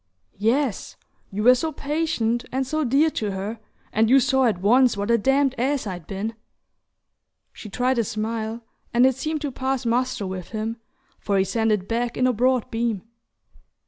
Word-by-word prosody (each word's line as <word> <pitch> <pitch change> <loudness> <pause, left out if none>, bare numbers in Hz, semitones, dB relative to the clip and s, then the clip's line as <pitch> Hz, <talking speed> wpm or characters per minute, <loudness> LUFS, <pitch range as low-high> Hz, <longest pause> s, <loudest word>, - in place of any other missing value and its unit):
"Yes: 235 +2 0 0.3
you 205 +2 -3
were 250 +2 +8
so 315 +6 -1
patient, 280 -6 -1
and 265 +1 -1
so 310 +4 -1
dear 285 +5 +3
to 210 -7 -2
her; 205 +4 -4 0.3
and 220 +1 +3
you 270 +2 +7
saw 265 +1 +2
at 215 -7 +1
once 240 +4 +4
what 200 +3 -1
a 235 - +5
damned 270 +3 +2
ass 270 +1 0
I'd 180 -5 -6
been!" 205 +3 -4 1.2
She 215 - -10
tried 250 +4 0
a - - +3
smile, 220 +2 -3 0.3
and 245 +2 +6
it 265 - +4
seemed 305 +4 -3
to 290 - -3
pass 260 0 -2
muster 240 -2 0
with 185 -1 -5
him, 225 +1 -3 0.4
for 200 -1 0
he 190 - +4
sent 225 +2 0
it 200 -3 0
back 235 +1 -2
in 255 - +2
a 255 - +3
broad 250 +1 +1
beam. 225 -4 -1
235 Hz, 180 wpm, -23 LUFS, 215-265 Hz, 1.2 s, were